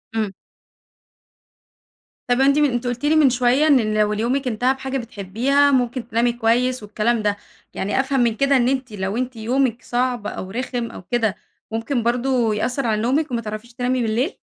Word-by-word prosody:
امم. 215 Hz, -3 st, 0 dB, 2.0 s
طب 245 Hz, +1 st, +3 dB
أنتِ 280 Hz, +1 st, +4 dB
من 295 Hz, -1 st, +4 dB
أنتِ 245 Hz, +1 st, -2 dB
قلتِ 245 Hz, +3 st, -3 dB
لي 305 Hz, +2 st, +3 dB
من 305 Hz, -4 st, +6 dB
شوية 255 Hz, +4 st, +2 dB
إن 245 Hz, -8 st, +3 dB
لو 210 Hz, 0 st, +2 dB
ال 210 Hz, -, -3 dB
يومك 255 Hz, +4 st, 0 dB
انتهى 250 Hz, +3 st, +1 dB
بحاجة 265 Hz, 0 st, -4 dB
بتحبيها 240 Hz, +6 st, +1 dB
ممكن 245 Hz, -2 st, 0 dB
تنامي 235 Hz, +1 st, +1 dB
كويس 240 Hz, +1 st, +1 dB
والكلام 215 Hz, +2 st, 0 dB
ده، 205 Hz, -1 st, 0 dB, 0.4 s
يعني 200 Hz, +7 st, -1 dB
أفهم 270 Hz, 0 st, +1 dB
من 235 Hz, -2 st, +2 dB
كده 275 Hz, +3 st, +3 dB
إن 245 Hz, -1 st, +2 dB
أنتِ 260 Hz, -2 st, -2 dB
لو 195 Hz, +1 st, -3 dB
أنتِ 255 Hz, 0 st, -3 dB
يومك 240 Hz, +2 st, 0 dB
صعب 245 Hz, -3 st, -1 dB
أو 185 Hz, -, -6 dB
رخم 245 Hz, 0 st, -3 dB
أو -, -, -9 dB
كده 220 Hz, +1 st, 0 dB, 0.4 s
ممكن 230 Hz, +3 st, -1 dB
برضه 240 Hz, -1 st, +1 dB
يأثر 250 Hz, +5 st, -1 dB
على 215 Hz, -1 st, 0 dB
نومك 275 Hz, +5 st, 0 dB
وما 235 Hz, -1 st, -1 dB
تعرفيش 215 Hz, +2 st, -7 dB
تنامي 250 Hz, +1 st, -1 dB
بالليل؟ 235 Hz, -, -1 dB
245 Hz, 180 wpm, -21 LUFS, 225-265 Hz, 2.0 s, من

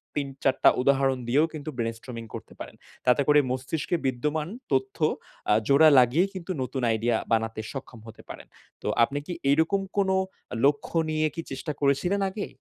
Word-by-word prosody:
৩-৪ 135 Hz, -2 st, -1 dB
টা -, -, +9 dB
উদাহরণ 135 Hz, 0 st, +2 dB
দিয়েও 140 Hz, +6 st, +3 dB
কিন্তু 155 Hz, -1 st, -6 dB
ব্রেইনস্টর্মিং 115 Hz, 0 st, -4 dB
করতে -, -, -9 dB
পারেন। -, -, -8 dB, 0.3 s
তাতে 125 Hz, +2 st, +4 dB
করে 150 Hz, 0 st, +6 dB
মস্তিষ্কে 130 Hz, +7 st, -2 dB
বিদ্যমান 150 Hz, +4 st, -1 dB, 0.2 s
তথ্য 130 Hz, -1 st, 0 dB, 0.5 s
আ -, -, +6 dB
জোড়া 150 Hz, +3 st, +7 dB
লাগিয়ে 125 Hz, +9 st, +4 dB
কিন্তু 185 Hz, -1 st, -6 dB
নতুন 130 Hz, +1 st, -3 dB
আইডিয়া 115 Hz, +1 st, +1 dB, 0.2 s
বানাতে 110 Hz, -1 st, 0 dB
সক্ষম 130 Hz, -4 st, -8 dB
হতে 110 Hz, -, -12 dB
পারেন। -, -, -9 dB, 0.3 s
তো -, -, -5 dB, 0.2 s
আপনি 140 Hz, +5 st, 0 dB
কি 175 Hz, -, -4 dB, 0.2 s
এইরকম 160 Hz, +7 st, +2 dB, 0.2 s
কোন 195 Hz, -1 st, +2 dB, 0.6 s
লক্ষ্য 145 Hz, +3 st, +1 dB
নিয়ে 155 Hz, 0 st, +1 dB
কি 165 Hz, -, -3 dB
চেষ্টা 135 Hz, +4 st, -4 dB
করেছিলেন 145 Hz, +8 st, +1 dB
আগে? 200 Hz, +2 st, -5 dB
140 Hz, 160 wpm, -26 LUFS, 125-155 Hz, 0.6 s, টা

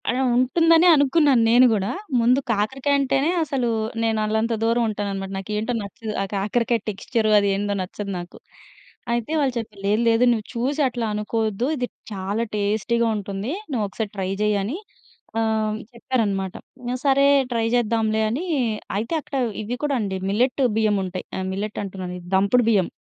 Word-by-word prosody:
అలా 255 Hz, +2 st, +1 dB
ఉంటుందనే 330 Hz, +7 st, +4 dB
అనుకున్నాను 285 Hz, -3 st, +4 dB
నేను 245 Hz, +2 st, +7 dB
గూడా. 200 Hz, -1 st, 0 dB, 0.3 s
ముందు 245 Hz, +3 st, +4 dB
కాకరకాయంటేనే 270 Hz, +6 st, +1 dB
అసలు 270 Hz, -5 st, -1 dB, 0.4 s
నేను 225 Hz, -1 st, +1 dB
అల్లంత 220 Hz, +2 st, 0 dB
దూరం 230 Hz, +1 st, +2 dB
ఉంటాననమాట. 200 Hz, -2 st, -3 dB
నాకేంటో 210 Hz, +5 st, -2 dB
నచ్చదు 215 Hz, +2 st, -6 dB
ఆ -, -, +1 dB
కాకరకాయ 230 Hz, +4 st, +1 dB
టెక్స్చర్ 215 Hz, +2 st, -1 dB
అదేందో 200 Hz, 0 st, 0 dB
నచ్చదు 200 Hz, +2 st, -5 dB
నాకు. 175 Hz, 0 st, -10 dB, 0.8 s
అయితే 235 Hz, +4 st, -2 dB
వాళ్ళు 275 Hz, -3 st, +1 dB
చెప్పారు. 215 Hz, -3 st, -6 dB
లేదు 210 Hz, +3 st, +2 dB
లేదు. 225 Hz, +1 st, +3 dB
నువ్వు 220 Hz, -3 st, -1 dB
చూసి 270 Hz, +6 st, 0 dB
అట్లా 240 Hz, -2 st, -3 dB
అనుకోవద్దు. 220 Hz, +2 st, -1 dB
ఇది 250 Hz, -1 st, -1 dB, 0.3 s
చాలా 200 Hz, +3 st, -2 dB
టేస్టీగా 220 Hz, +3 st, +1 dB
ఉంటుంది. 200 Hz, +3 st, -4 dB, 0.2 s
నువ్వొకసారి 215 Hz, -2 st, -2 dB
ట్రై 190 Hz, -1 st, -2 dB
జెయ్యని 210 Hz, -, 0 dB, 0.6 s
ఆహ్, 225 Hz, -, +2 dB, 0.3 s
హ్మ్. -, -, -5 dB, 0.2 s
చెప్పారనమాట. 210 Hz, -6 st, -1 dB, 0.5 s
సరే 275 Hz, 0 st, +4 dB, 0.3 s
ట్రై 230 Hz, -1 st, 0 dB
జేద్దాంలే 220 Hz, -2 st, +1 dB
అనీ 275 Hz, +11 st, -2 dB, 0.5 s
అయితే 225 Hz, +8 st, -3 dB
అక్కడ 280 Hz, -, -8 dB, 0.3 s
ఇవి 240 Hz, +4 st, -4 dB
కూడా 290 Hz, -2 st, +1 dB
అండి 195 Hz, -2 st, -2 dB
మిల్లెట్ 250 Hz, +6 st, +1 dB
బియ్యముంటాయి. 195 Hz, -4 st, 0 dB
ఆహ్, 190 Hz, 0 st, -3 dB
మిల్లెట్ 205 Hz, +2 st, -4 dB
అంటున్నాను, 185 Hz, -2 st, -6 dB
ఇది 175 Hz, -, -14 dB
దంపుడు 200 Hz, +5 st, +3 dB
బియ్యం. 195 Hz, -6 st, +3 dB
220 Hz, 145 wpm, -23 LUFS, 200-245 Hz, 0.8 s, నేను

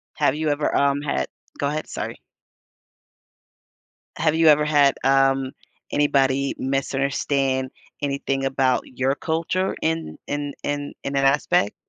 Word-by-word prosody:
Have 135 Hz, -, +2 dB
you 155 Hz, 0 st, -1 dB
ever, 145 Hz, 0 st, 0 dB
um, 140 Hz, 0 st, +2 dB
had 145 Hz, -, -1 dB, 0.3 s
Go 140 Hz, -, +1 dB
ahead, 155 Hz, +2 st, -3 dB
sorry. -, -, -5 dB, 2.0 s
Have 160 Hz, 0 st, +2 dB
you 165 Hz, 0 st, +4 dB
ever 150 Hz, 0 st, +6 dB
had, 145 Hz, -3 st, +4 dB
um, 135 Hz, -1 st, +3 dB, 0.4 s
anybody 140 Hz, -2 st, +2 dB
misunderstand 135 Hz, 0 st, 0 dB, 0.3 s
anything 140 Hz, -1 st, -1 dB
about 135 Hz, -1 st, +2 dB
your 130 Hz, +2 st, -1 dB
culture 170 Hz, +5 st, -1 dB
in 160 Hz, 0 st, -2 dB
in 145 Hz, -1 st, -3 dB
in 145 Hz, 0 st, -3 dB
in 140 Hz, -, -3 dB
that 135 Hz, 0 st, +2 dB
aspect? 135 Hz, -7 st, +2 dB
140 Hz, 125 wpm, -23 LUFS, 135-150 Hz, 2.0 s, ever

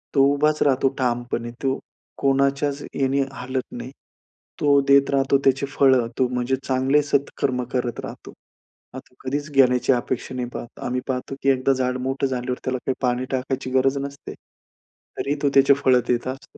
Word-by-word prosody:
तो 135 Hz, -, +6 dB
उभाच 150 Hz, +1 st, +1 dB
राहतो 135 Hz, -1 st, +3 dB
ठामपणे, 120 Hz, -2 st, -2 dB
तो 135 Hz, 0 st, 0 dB, 0.4 s
कोणाच्याच 140 Hz, +1 st, +1 dB, 0.2 s
याने 135 Hz, +1 st, +2 dB
हालत 130 Hz, 0 st, -5 dB
नाही. 125 Hz, +1 st, -7 dB, 0.7 s
तो 145 Hz, -1 st, +4 dB
देत 140 Hz, 0 st, +5 dB
राहतो 135 Hz, 0 st, +3 dB
त्याची 135 Hz, +1 st, +3 dB
फळं, 130 Hz, -3 st, +3 dB
तो 130 Hz, -, +3 dB
म्हणजे 125 Hz, +1 st, -1 dB
चांगले 135 Hz, +3 st, +3 dB
सत्कर्म 140 Hz, -2 st, -1 dB
करत 125 Hz, -2 st, -1 dB
राहतो. -, -, -9 dB, 0.6 s
आता -, -, -4 dB
तो 125 Hz, -, -29 dB
कधीच 145 Hz, +3 st, -3 dB
घेण्याची 130 Hz, -2 st, +4 dB
अपेक्षा 125 Hz, +1 st, -3 dB
नाही 125 Hz, -1 st, -3 dB
पाहत. 120 Hz, -, -8 dB
आम्ही 125 Hz, +1 st, -1 dB
पाहतो, 130 Hz, +1 st, -3 dB
की 135 Hz, -, +2 dB
एकदा 135 Hz, +1 st, +2 dB
झाड 125 Hz, -1 st, -1 dB
मोठं 135 Hz, +2 st, -1 dB
झाल्यावर 125 Hz, -1 st, -3 dB
त्याला 130 Hz, 0 st, -1 dB
काही 130 Hz, -, +1 dB
पाणी 125 Hz, 0 st, 0 dB
टाकायची 130 Hz, 0 st, -2 dB
गरज 135 Hz, +1 st, +2 dB
नसते, 140 Hz, +1 st, -7 dB, 0.8 s
तरी 145 Hz, +2 st, -1 dB
तो 140 Hz, -, +4 dB
त्याचे 140 Hz, 0 st, +6 dB
फळ 135 Hz, -2 st, +3 dB
देत 120 Hz, 0 st, 0 dB
असतो. 135 Hz, +1 st, -8 dB
130 Hz, 165 wpm, -23 LUFS, 125-140 Hz, 0.8 s, तो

